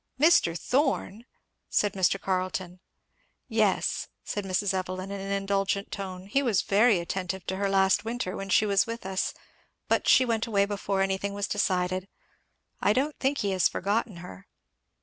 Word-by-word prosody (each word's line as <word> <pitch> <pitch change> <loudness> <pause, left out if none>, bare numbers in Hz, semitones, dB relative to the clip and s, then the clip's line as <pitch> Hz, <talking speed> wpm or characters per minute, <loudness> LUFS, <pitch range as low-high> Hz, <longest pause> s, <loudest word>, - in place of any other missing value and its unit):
"Mr. 295 - +4
Thorn!" 245 - 0 0.4
said 205 -2 +1
Mr. 190 0 +2
Carleton. 185 -1 -2 0.7
"Yes," 220 -5 +1 0.2
said 205 -1 -4
Mrs. 195 +1 0
Evelyn 185 +1 -3
in 200 -1 -5
an 195 0 -5
indulgent 195 0 -1
tone, 185 -2 -6
"he 240 +8 +1
was 230 -8 +1
very 210 +1 +4
attentive 180 +1 -4
to 190 - -3
her 200 0 0
last 190 0 +3
winter 225 -4 -3
when 195 0 -6
she 210 - +4
was 200 0 +2
with 230 -3 -6
us, 190 0 -2 0.5
but - - +1
she 260 - +6
went 230 -1 0
away 200 -3 +2
before 200 -1 -1
anything 195 +1 -1
was 205 0 -2
decided. 185 -2 0 0.7
I 205 - +4
don't 285 +5 -1
think 280 +1 +1
he 200 - 0
has 185 -2 +3
forgotten 205 +1 -1
her." 95 - -12
195 Hz, 165 wpm, -27 LUFS, 185-215 Hz, 0.7 s, she